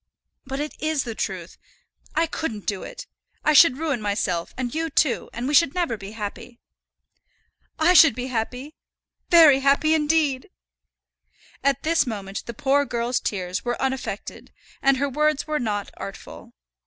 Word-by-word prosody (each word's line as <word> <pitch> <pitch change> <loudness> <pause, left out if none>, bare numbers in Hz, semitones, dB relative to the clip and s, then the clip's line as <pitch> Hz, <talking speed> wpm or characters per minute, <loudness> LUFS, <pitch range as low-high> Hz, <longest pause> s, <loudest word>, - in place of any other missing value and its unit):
"But 270 +1 -4
it 295 +1 -4
is 310 -2 0
the 235 - -5
truth. - - -5 0.6
I 330 - +3
couldn't 265 -10 -5
do 200 -3 -2
it. - - -9 0.4
I 305 - +4
should 290 -3 +7
ruin 295 -6 -2
myself 195 -5 -1
and 245 -2 -3
you 325 +1 -2
too, 290 -3 +1
and 240 +2 -4
we 290 - -1
should 305 0 +4
never 345 -10 0
be 200 0 -9
happy." 225 +3 -7 1.2
"I 325 +3 +4
should 325 -9 +7
be 250 - -4
happy, 255 +4 -4 0.6
very 315 -6 +7
happy 280 +3 +3
indeed." 300 -1 +1 1.1
At 275 -2 +1
this 320 -3 +2
moment 200 -3 -5
the 235 - -5
poor 285 +1 +2
girl's 240 -2 -1
tears 180 -2 -3
were 240 0 -2
unaffected, 265 -1 -4 0.3
and 275 0 +3
her 280 +2 0
words 300 +1 0
were 305 -1 -1
not 205 -4 -3
artful. 195 - -10
270 Hz, 155 wpm, -23 LUFS, 230-305 Hz, 1.2 s, should